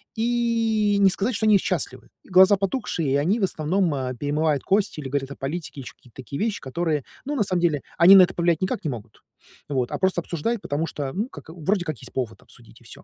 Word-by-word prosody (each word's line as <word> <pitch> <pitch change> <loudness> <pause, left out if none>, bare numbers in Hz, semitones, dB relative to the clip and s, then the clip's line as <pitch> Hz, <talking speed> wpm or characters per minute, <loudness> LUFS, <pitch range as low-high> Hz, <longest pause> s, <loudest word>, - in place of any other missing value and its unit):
и 225 -2 +1
не 195 -1 +6
сказать, 205 +6 -1
что 220 - -1
они 215 -2 +6
счастливы. 130 -10 -3 0.2
Глаза 190 +2 +6
потухшие, 195 - -2
и - - +3
они, 185 +11 +1
в - - 0
основном, 175 0 0
э, 130 -2 -3
перемывают 145 +2 0
кости 195 -5 0
или 135 - -6
говорят 135 0 -2
о - - -6
политике 145 0 -5
и - - -9
ещё - - -10
какие-то 120 -3 -23
такие 130 +2 -7
вещи, 220 -1 -1
которые, 150 +1 -2 0.2
ну, 295 +2 -2
на 235 - +2
самом 185 -2 -1
деле, 155 -5 +1 0.2
они 180 +3 +9
на 195 - +10
это 180 +1 0
повлиять 170 -2 +1
никак 185 - -2
не - - 0
могут, 115 -5 -10 0.5
вот, 130 -4 -1
а - - -2
просто 190 -2 +1
обсуждают, 185 +8 -3
потому 150 -1 -2
что, 140 -4 -4
ну 210 +5 -2
как, - - -12
вроде 175 +4 -1
как 155 -5 -4
есть - - -11
повод 125 -4 -4
обсудить, - - -18
и - - -19
всё. - - -13
175 Hz, 235 wpm, -24 LUFS, 145-200 Hz, 0.5 s, на